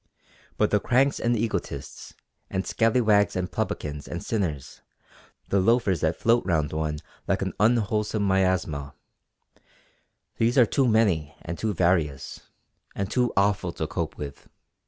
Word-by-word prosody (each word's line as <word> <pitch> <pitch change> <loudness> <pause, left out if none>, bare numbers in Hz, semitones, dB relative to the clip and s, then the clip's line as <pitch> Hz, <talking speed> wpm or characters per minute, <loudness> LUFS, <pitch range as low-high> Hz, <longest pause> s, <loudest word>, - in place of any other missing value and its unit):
But 105 - +2
the 105 - +3
cranks 135 +6 +2
and 120 0 +1
egotists, 105 -10 -4 0.3
and 95 0 -2
scallywags 110 -3 +2
and 90 -1 -2
publicans 75 -1 -3
and 85 - -5
sinners, 85 - -3 0.7
the 100 - +3
loafers 100 -2 +2
that 80 +1 +1
float 115 +5 +2
round 80 -6 0
one 80 -1 -2 0.3
like - - +1
an - - -3
unwholesome 105 -1 +1
miasma; 90 -7 0 1.4
these 115 +3 +2
are 125 - +7
too 130 +4 +1
many 100 -10 +2
and 85 +1 -4
too 110 -3 -1
various, 80 -6 0 0.6
and 100 +1 -3
too 125 -1 +1
awful 100 -2 +2
to - - -3
cope - - -4
with. 70 -2 -8
95 Hz, 135 wpm, -26 LUFS, 80-115 Hz, 1.4 s, are